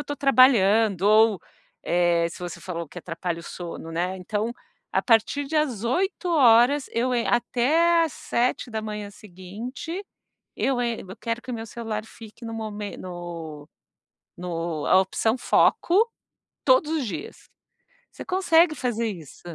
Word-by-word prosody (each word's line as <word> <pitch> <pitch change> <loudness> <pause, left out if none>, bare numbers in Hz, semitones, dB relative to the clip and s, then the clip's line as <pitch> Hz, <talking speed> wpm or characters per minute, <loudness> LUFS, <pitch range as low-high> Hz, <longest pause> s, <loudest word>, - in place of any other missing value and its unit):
estou 290 0 -5
trabalhando 225 - +4
ou, 215 0 +5 0.5
eh, 170 -1 +2
se 170 - -11
você 175 -1 -6
falou 170 -3 -5
que 175 - -9
atrapalha 170 0 -4
o - - -9
sono, 170 -1 -7
né, 180 +3 -2
então, 210 +5 -3 0.4
a - - +4
partir 230 +5 +2
de 310 +3 -2
as 255 -8 0
20h 280 - +3
eu 250 +2 0
en 235 -1 0
até 315 +8 +3
às 320 - -4
7h 220 -4 -2
seguinte, 215 - -8 0.5
eu 265 -2 0
en 235 -2 -1
eu 190 0 -11
quero 230 0 -3
que 255 - -7
o - - -3
meu 225 -1 -5
celular 220 -1 -5
fique 225 +1 -13
no 225 - -5
mo 220 -1 -4 0.3
no 170 -4 -8 0.7
no 165 -3 -4
a - - +6
opção 220 +4 0
foco 390 - +3 0.6
todos - - +4
os 305 -6 -1
dias. 415 - -7 0.6
Você - - -9
consegue 340 -3 +3
fazer 235 -3 -1
isso. 170 -9 -8
225 Hz, 145 wpm, -25 LUFS, 185-260 Hz, 0.7 s, a